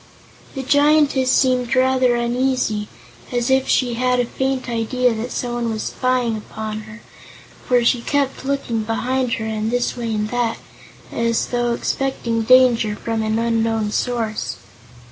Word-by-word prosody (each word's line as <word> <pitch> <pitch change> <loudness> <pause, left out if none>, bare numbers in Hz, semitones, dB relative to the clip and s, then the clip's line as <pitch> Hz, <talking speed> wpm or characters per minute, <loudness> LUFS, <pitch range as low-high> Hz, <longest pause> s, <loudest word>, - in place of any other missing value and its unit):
The 270 - -3
Giantess 285 -1 +3
seemed 255 -2 +2
rather 255 -1 +3
uneasy, 240 -3 0 0.4
as 245 +1 0
if 265 0 +3
she 245 -2 +2
had 250 +1 +1
a 245 - +2
faint 265 +1 -2
idea 240 +1 0
that 225 +3 -4
someone 240 -1 -2
was 220 -1 -3
spying 255 -3 0
upon 215 0 -6
her, 220 +2 -11 0.7
for 245 -2 +3
she 235 0 +3
kept 275 +1 -1
looking 270 -5 -1
behind 245 +3 -1
her 220 - -2
and 220 0 -2
this 245 +1 0
way 235 -2 -3
and 210 0 -1
that, 240 -1 -1 0.5
as 230 0 0
though 240 -1 0
expecting 235 -2 -1
danger 235 -3 +4
from 225 +1 -3
an 220 0 0
unknown 225 -2 0
source. 220 - -2
240 Hz, 145 wpm, -20 LUFS, 225-255 Hz, 0.7 s, danger